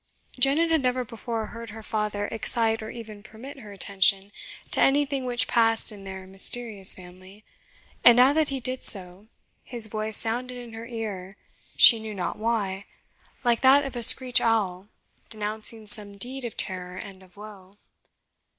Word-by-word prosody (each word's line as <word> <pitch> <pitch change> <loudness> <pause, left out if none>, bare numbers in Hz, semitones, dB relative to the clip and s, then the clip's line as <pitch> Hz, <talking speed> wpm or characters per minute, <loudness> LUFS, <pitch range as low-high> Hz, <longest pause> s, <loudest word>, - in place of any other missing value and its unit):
Janet 295 +6 +3
had 320 -2 +2
never 250 -1 -1
before 230 -1 -6
heard 230 +1 -10
her 220 +1 -11
father 210 -1 -3
excite 225 0 -1
or 215 - -8
even 220 -3 -10
permit 225 +7 -12
her 210 -5 -12
attention 195 0 +2 0.4
to - - -1
anything 275 -1 +1
which 250 0 -1
passed 225 -1 +1
in 200 -2 -12
their 190 -1 -9
mysterious 195 +1 +2
family; 185 +3 -15 0.6
and 240 -1 +7
now 255 +3 +5
that 315 -1 0
he 275 -1 -4
did 255 +1 -3
so, 190 +1 0 0.4
his 235 -3 0
voice 215 0 -4
sounded 245 +2 -3
in 240 -2 -11
her 225 +1 -9
ear 210 -5 -7 0.4
she 230 - +8
knew 220 -1 -8
not 185 +1 -5
why 205 -4 -3 0.6
like 240 -2 +1
that 275 +2 +5
of 270 - -7
a 240 - -3
screech 250 +2 +6
owl 205 -5 -1 0.4
denouncing 215 +1 -5
some 205 -1 +1
deed 255 +4 -5
of 230 - -8
terror 180 -2 -2
and 190 -1 -10
of 185 0 -22
woe. 200 -2 -13
220 Hz, 165 wpm, -25 LUFS, 200-245 Hz, 0.6 s, she